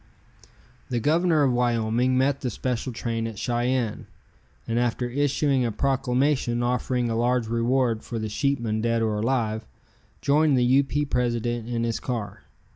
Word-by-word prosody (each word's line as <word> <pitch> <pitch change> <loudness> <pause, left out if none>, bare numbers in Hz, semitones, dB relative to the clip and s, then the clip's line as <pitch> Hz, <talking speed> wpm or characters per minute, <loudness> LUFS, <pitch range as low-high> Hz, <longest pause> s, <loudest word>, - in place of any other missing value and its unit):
The 120 - 0
Governor 160 +3 +3
of 130 -3 +3
Wyoming 120 +1 +1
met 135 +1 +1
the 125 - -1
special 125 +2 -3
train 115 -1 -3
at 110 -2 -7
Cheyenne, 120 0 -1 0.6
and 115 +1 0
after 120 0 0
issuing 140 0 +1
a 120 - 0
proclamation 130 0 0
offering 125 0 0
a - - -1
large 120 +1 +1
reward 115 0 +1
for 115 - -6
the 110 -1 -2
sheepmen 115 -2 -1
dead 115 0 +1
or 105 -1 0
alive, 110 -2 0 0.6
joined 145 0 +3
the 125 - +3
U. 130 +3 +4
P. 145 +2 -1
president 120 -3 -1
in 115 -1 -1
his 115 -1 -1
car. 115 -6 -4
120 Hz, 155 wpm, -25 LUFS, 115-130 Hz, 0.6 s, U